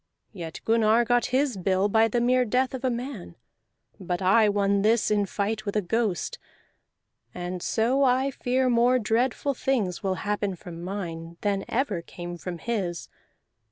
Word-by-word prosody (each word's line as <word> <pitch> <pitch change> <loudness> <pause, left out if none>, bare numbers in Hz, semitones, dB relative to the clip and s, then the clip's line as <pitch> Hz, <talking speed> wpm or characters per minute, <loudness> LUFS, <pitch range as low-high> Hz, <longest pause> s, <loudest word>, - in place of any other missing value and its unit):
Yet 165 -5 -7
Gunnar 225 +1 +3
got 245 +1 +2
his 255 -2 +1
bill 190 +1 +1
by 220 +2 +4
the 240 +2 0
mere 250 +1 +3
death 250 +3 0
of 260 0 -5
a 260 - +2
man; 240 - -5 0.6
but 180 -1 -3
I 205 +3 +4
won 200 -1 +2
this 220 +1 +2
in 205 -1 +2
fight 215 +3 -2
with 200 -1 -4
a 210 - +3
ghost, 210 -1 -1 1.0
and 180 0 -4
so 245 +8 +1
I 260 +1 +2
fear 255 0 0
more 245 +1 +4
dreadful 245 +5 0
things 235 -9 -1
will 190 -1 -1
happen 205 -2 -1
from 170 -1 -10
mine 170 -3 -6
than 200 -2 0
ever 225 -8 -1
came 175 +1 -8
from 180 0 -5
his. 185 -4 -3
215 Hz, 160 wpm, -26 LUFS, 185-245 Hz, 1.0 s, by